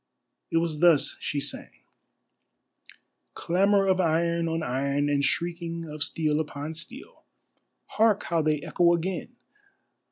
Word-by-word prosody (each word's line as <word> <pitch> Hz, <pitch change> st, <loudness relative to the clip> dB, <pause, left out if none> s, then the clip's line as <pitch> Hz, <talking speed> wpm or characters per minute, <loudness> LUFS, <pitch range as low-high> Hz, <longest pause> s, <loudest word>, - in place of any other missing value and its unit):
It -, -, +1 dB
was 165 Hz, -2 st, -1 dB
thus 170 Hz, -4 st, +4 dB
she 145 Hz, -, -2 dB
sang: -, -, -4 dB, 1.7 s
Clamour 195 Hz, +3 st, +2 dB
of 190 Hz, -1 st, +2 dB
iron 170 Hz, 0 st, +1 dB
on 165 Hz, 0 st, -2 dB
iron, 140 Hz, +2 st, 0 dB
and 140 Hz, -1 st, +1 dB
shrieking 170 Hz, +1 st, -2 dB
of 150 Hz, -1 st, -3 dB
steel 155 Hz, -1 st, 0 dB
upon 150 Hz, 0 st, -4 dB
steel, 195 Hz, -, -9 dB, 0.6 s
Hark 215 Hz, -2 st, +2 dB
how 165 Hz, -1 st, 0 dB
they 155 Hz, -1 st, 0 dB
echo 175 Hz, 0 st, +3 dB
again! 185 Hz, +7 st, -4 dB
165 Hz, 125 wpm, -26 LUFS, 150-175 Hz, 1.7 s, thus